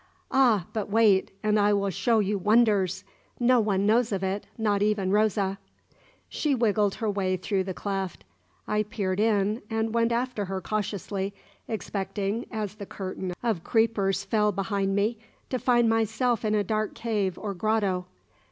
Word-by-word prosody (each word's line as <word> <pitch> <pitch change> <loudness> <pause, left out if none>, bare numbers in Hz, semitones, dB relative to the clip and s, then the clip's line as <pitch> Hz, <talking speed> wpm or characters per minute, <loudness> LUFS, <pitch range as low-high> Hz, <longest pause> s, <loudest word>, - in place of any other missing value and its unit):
"Ah, 235 -9 +4
but 215 -3 -3
wait, 210 -3 +4
and 215 0 +3
I 205 0 +4
will 200 -1 +1
show 230 +6 +1
you 205 -1 +1
wonders! 205 -3 +3 0.4
No 250 0 +4
one 200 -3 +1
knows 225 +2 +3
of 195 -1 -1
it, 190 +2 -2
not 210 -3 +1
even 205 -2 +1
Rosa." 200 -2 +1 0.7
She 295 -3 0
wriggled 210 -4 +2
her 220 -2 -1
way 190 -2 0
through 190 +1 -1
the 190 -2 -4
cleft. 195 -3 -4 0.4
I 210 - +1
peered 200 -3 -2
in, 210 0 +2
and 225 0 -1
went 230 0 +2
after 235 -3 -1
her 190 0 -3
cautiously, 200 0 -3 0.3
expecting, 200 +1 -3
as 215 -4 -4
the 205 -2 -9
curtain 185 -1 -5
of 220 -8 0
creepers 220 -4 +1
fell 210 -2 +2
behind 195 0 -1
me, 210 +3 0 0.3
to 255 - 0
find 240 -2 +3
myself 225 +1 +1
in 215 -1 +1
a 210 - +2
dark 215 +1 -2
cave 210 -5 -1
or 205 -2 -4
grotto. 195 -2 0
210 Hz, 160 wpm, -27 LUFS, 195-225 Hz, 0.7 s, Ah